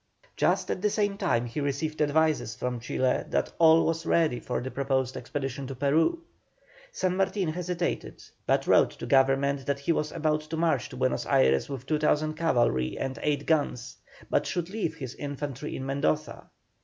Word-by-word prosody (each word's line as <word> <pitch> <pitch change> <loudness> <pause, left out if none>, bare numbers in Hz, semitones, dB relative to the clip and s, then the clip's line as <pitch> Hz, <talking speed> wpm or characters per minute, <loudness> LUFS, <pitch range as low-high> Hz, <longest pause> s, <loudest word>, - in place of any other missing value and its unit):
Just - - +1
at 185 - -3
the 210 - +2
same 205 -1 0
time 150 - 0
he 120 +5 -5
received 145 +2 -2
advices 150 -5 +1
from 125 -1 -3
Chile 125 +2 0
that - - 0
all 165 0 +6
was 165 0 -1
ready 160 -6 +2
for 125 - -3
the 130 +1 -5
proposed 130 -2 -1
expedition 135 +1 -4
to 135 - -6
Peru. 160 - +1 0.7
San 185 - -1
Martin 195 -2 0
hesitated, 175 +1 -3 0.2
but - - +2
wrote - - +5
to - - -8
Government 135 0 +2
that 140 -1 +1
he 140 - +1
was 150 -2 0
about 155 -2 0
to 155 +1 -6
march 165 -2 +1
to 130 - -9
Buenos 130 0 0
Ayres 65 - +3
with 135 -2 -6
2,000 155 +1 +1
cavalry 120 - +1
and 135 0 -4
eight 145 -1 0
guns, 145 -7 0 0.3
but - - +1
should 175 0 -3
leave 200 -7 -2
his 130 -6 -6
infantry 145 0 -5
in 130 - -5
Mendoza. 135 - -1
145 Hz, 175 wpm, -27 LUFS, 130-165 Hz, 0.7 s, all